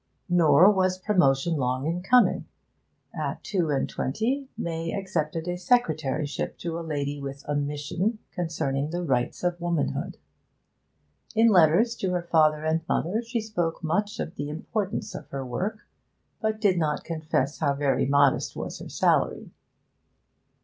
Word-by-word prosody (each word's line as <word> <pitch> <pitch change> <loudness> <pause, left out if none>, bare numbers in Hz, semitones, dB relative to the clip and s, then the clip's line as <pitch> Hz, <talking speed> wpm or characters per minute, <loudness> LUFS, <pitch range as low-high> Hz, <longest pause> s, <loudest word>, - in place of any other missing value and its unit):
Nor 175 +2 +6
was 185 -2 +1
promotion 170 -6 +2
long 130 0 -1
in 170 +3 -1
coming. 245 +6 +4 0.7
At - - -4
two 180 -6 0
and 140 -2 +1
twenty 255 - -2
May 165 0 -3
accepted 165 -4 -2
a 175 0 -2
secretaryship 155 - 0
to 170 -1 -4
a - - -4
lady 145 -3 -3
with 140 0 -7
a 145 - -1
mission 150 +9 -1
concerning 155 -5 -2
the 175 +2 -3
rights 130 -3 -1
of 175 -1 -1
womanhood. 170 - -1 1.2
In 225 +1 +6
letters 185 +5 +5
to 185 -2 -1
her 175 -1 -1
father 155 -2 +3
and 160 +1 +1
mother 200 +8 0
she 230 0 -3
spoke 175 -7 -2
much 205 +7 -1
of 165 - -5
the 145 0 -3
importance 200 +6 -3
of - - -8
her 135 -1 -4
work, 200 - -4 0.5
but 220 0 -1
did 195 -5 +3
not 150 -2 0
confess 155 -4 -2
how 145 -3 +1
very 135 -2 +1
modest 140 -1 +3
was - - -5
her - - -8
salary. - - +1
165 Hz, 150 wpm, -26 LUFS, 145-190 Hz, 1.2 s, Nor